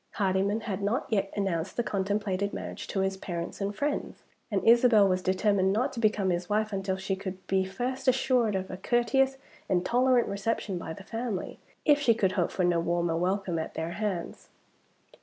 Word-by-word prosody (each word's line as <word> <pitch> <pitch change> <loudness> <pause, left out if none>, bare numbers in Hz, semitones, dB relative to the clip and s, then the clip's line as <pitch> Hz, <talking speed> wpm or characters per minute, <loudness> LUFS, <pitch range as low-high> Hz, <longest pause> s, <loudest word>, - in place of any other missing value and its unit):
Hardyman 195 +2 +1
had 205 -3 -4
not 210 +6 0
yet 200 -3 0
announced 190 -4 -2
the 240 - +2
contemplated 200 -1 -1
marriage - - -6
to 195 - -1
his 190 0 -1
parents 170 0 -5
and 200 +1 -2
friends; 290 +4 -3 0.3
and 205 -2 -1
Isabel 230 -3 +6
was 185 -1 +1
determined 190 +1 +2
not 245 +7 0
to 240 - -5
become 210 -4 +2
his 175 0 -2
wife 215 0 0
until 195 -1 -1
she 195 0 -2
could 190 -1 -7
be 190 0 +1
first 250 +8 -4
assured 255 -4 +3
of 190 0 -3
a 185 - -5
courteous 260 +6 +2 0.3
and 180 0 +1
tolerant 250 +1 +3
reception 200 -2 -2
by 160 - -5
the 195 - -11
family 225 -2 -4 0.3
if 295 -2 +5
she 235 -6 +3
could 195 -4 +2
hope 180 -3 0
for 185 - -1
no 175 -1 +3
warmer 170 0 0
welcome 180 0 0
at 160 - -5
their 160 +1 -3
hands. 195 -4 -4
200 Hz, 190 wpm, -28 LUFS, 185-225 Hz, 0.3 s, Isabel